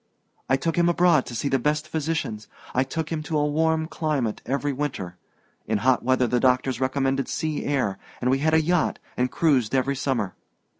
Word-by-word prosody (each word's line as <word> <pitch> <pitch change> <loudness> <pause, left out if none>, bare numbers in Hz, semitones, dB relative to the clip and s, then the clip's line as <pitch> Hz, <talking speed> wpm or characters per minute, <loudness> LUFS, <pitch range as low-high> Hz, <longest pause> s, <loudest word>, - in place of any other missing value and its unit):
I 135 - +4
took 165 +4 -2
him 175 0 +4
abroad 175 -5 +3
to 120 - -6
see 115 - -1
the 135 -1 +2
best 150 +4 0
physicians 155 -9 -3 0.3
I 130 - +3
took 160 +4 -4
him 160 -2 -1
to 155 0 -2
a 150 - +2
warm 160 +1 +1
climate 150 -8 -2
every 140 +2 0
winter. 130 -11 -4 0.5
In 110 - +1
hot 130 +4 +2
weather 130 0 +2
the 125 +1 +1
doctors 130 +1 +2
recommended 135 +1 0
sea 155 -2 -2
air, 130 -9 0 0.2
and 125 +1 +1
we 135 - +2
had 155 +2 +2
a 160 - +4
yacht 175 0 +1 0.2
and 125 0 +1
cruised 135 -6 +2
every 135 +1 +1
summer. 125 -8 -1
135 Hz, 195 wpm, -25 LUFS, 125-155 Hz, 0.5 s, I